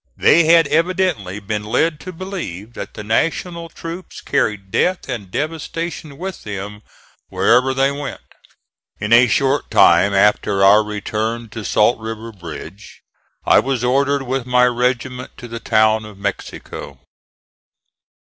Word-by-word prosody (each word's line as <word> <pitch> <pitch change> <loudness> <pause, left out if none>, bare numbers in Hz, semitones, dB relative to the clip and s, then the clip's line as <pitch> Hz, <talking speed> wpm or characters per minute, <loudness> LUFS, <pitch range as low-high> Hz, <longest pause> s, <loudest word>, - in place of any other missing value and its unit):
They 170 0 +5
had 165 0 +6
evidently 165 - 0
been 105 0 -4
led 150 +9 0
to 185 - -8
believe 165 - -7
that - - -8
the 105 - -7
National 165 - -1
troops 170 +3 -8
carried 100 -3 -1
death 180 - 0
and 115 -8 -5
devastation 160 - -4
with 190 +3 -6
them 105 0 -6 0.5
wherever 125 +2 +3
they 135 +1 +2
went. 140 -1 -5 0.8
In 105 +2 0
a 120 +2 +7
short 135 +6 +1
time 100 - +5
after 100 0 +2
our 105 +2 +6
return 110 +2 -3
to 110 0 -7
Salt 105 +4 +2
River 110 +1 -6
bridge 90 +2 -10 0.4
I - - +6
was 130 -3 -1
ordered 140 +2 +1
with 130 -1 -3
my 125 0 +4
regiment 125 +1 -1
to 120 - -9
the 115 0 -6
town 110 -1 +2
of 105 -2 -12
Mexico. 100 -7 -6
120 Hz, 140 wpm, -19 LUFS, 105-145 Hz, 0.8 s, a